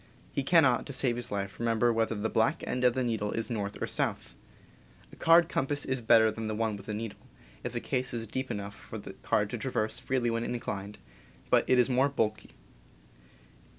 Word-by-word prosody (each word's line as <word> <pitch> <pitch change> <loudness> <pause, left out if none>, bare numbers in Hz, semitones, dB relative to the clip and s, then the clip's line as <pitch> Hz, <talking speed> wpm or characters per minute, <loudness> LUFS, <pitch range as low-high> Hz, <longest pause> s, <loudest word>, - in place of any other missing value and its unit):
He - - 0
cannot, 140 -5 +4
to 140 - -6
save 125 -2 +1
his 120 - -4
life, 100 -1 -3
remember 115 0 +2
whether 115 0 0
the 105 +1 -1
black 110 0 +1
end 125 - -2
of 125 -1 +4
the 130 - +1
needle 110 -4 -1
is 115 +2 -2
north 100 -3 -3
or - - -1
south. - - -2 0.8
A - - -10
card 165 0 +5
compass 145 -2 -1
[is 130 -1 -1
better 115 -1 +5
than 110 -1 -4
one 110 -2 0
with 100 +1 -10
a - - -1
needle, 110 -1 -5 0.4
if - - -3
the - - -1
case 125 0 -1
is 115 -1 -3
deep 130 +4 -4
enough 100 0 -4
for 110 - -9
the 100 -2 -8
card 105 +1 0
to 120 - -3
traverse 110 -3 -1
freely 125 -3 0
when 115 0 -1
inclined, 105 -4 -4 0.5
but - - +4
it 130 - +5
is 125 - +5
more 130 +2 +3
bulky. 110 -6 -1
115 Hz, 205 wpm, -30 LUFS, 110-125 Hz, 0.8 s, card